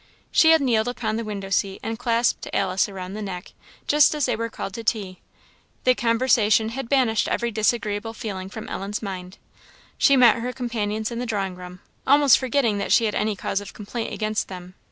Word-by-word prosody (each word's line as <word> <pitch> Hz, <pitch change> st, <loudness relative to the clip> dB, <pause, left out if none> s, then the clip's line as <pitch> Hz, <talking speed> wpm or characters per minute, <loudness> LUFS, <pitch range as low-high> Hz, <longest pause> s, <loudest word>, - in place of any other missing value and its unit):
She 320 Hz, -, +5 dB
had 320 Hz, -1 st, +6 dB
kneeled 235 Hz, -4 st, +2 dB
upon 225 Hz, -3 st, -2 dB
the 230 Hz, -, -3 dB
window 200 Hz, -3 st, -6 dB
seat 195 Hz, 0 st, 0 dB
and 225 Hz, +1 st, -4 dB
clasped 235 Hz, -1 st, 0 dB
Alice 190 Hz, 0 st, +1 dB
round 190 Hz, 0 st, -7 dB
the 215 Hz, -, -5 dB
neck, 185 Hz, -3 st, -6 dB, 0.3 s
just 295 Hz, +1 st, +4 dB
as 295 Hz, -3 st, +1 dB
they -, -, 0 dB
were 230 Hz, +1 st, -3 dB
called 195 Hz, -, -6 dB
to 230 Hz, -, -6 dB
tea. 195 Hz, -5 st, -2 dB, 0.6 s
The 255 Hz, -, +5 dB
conversation 230 Hz, -2 st, +2 dB
had 250 Hz, +1 st, -6 dB
banished 245 Hz, -5 st, +2 dB
every 235 Hz, 0 st, -1 dB
disagreeable 220 Hz, 0 st, -1 dB
feeling 190 Hz, -4 st, -5 dB
from 220 Hz, +2 st, -8 dB
Ellen's 205 Hz, +3 st, -4 dB
mind. 185 Hz, -1 st, -6 dB, 0.6 s
She 275 Hz, -2 st, +5 dB
met 245 Hz, -2 st, +6 dB
her 245 Hz, +2 st, -4 dB
companions 220 Hz, -3 st, -3 dB
in 235 Hz, -, -4 dB
the 245 Hz, -, -3 dB
drawing 195 Hz, -4 st, -2 dB
room, 180 Hz, 0 st, -11 dB, 0.3 s
almost 280 Hz, -1 st, +6 dB
forgetting 250 Hz, -5 st, +1 dB
that -, -, -3 dB
she 230 Hz, -, +5 dB
had 210 Hz, -, -1 dB
any 215 Hz, -1 st, 0 dB
cause 195 Hz, +1 st, -2 dB
of 205 Hz, -, -11 dB
complaint 225 Hz, +2 st, -5 dB
against 215 Hz, 0 st, -2 dB
them. 180 Hz, -1 st, -9 dB
220 Hz, 195 wpm, -23 LUFS, 200-240 Hz, 0.6 s, had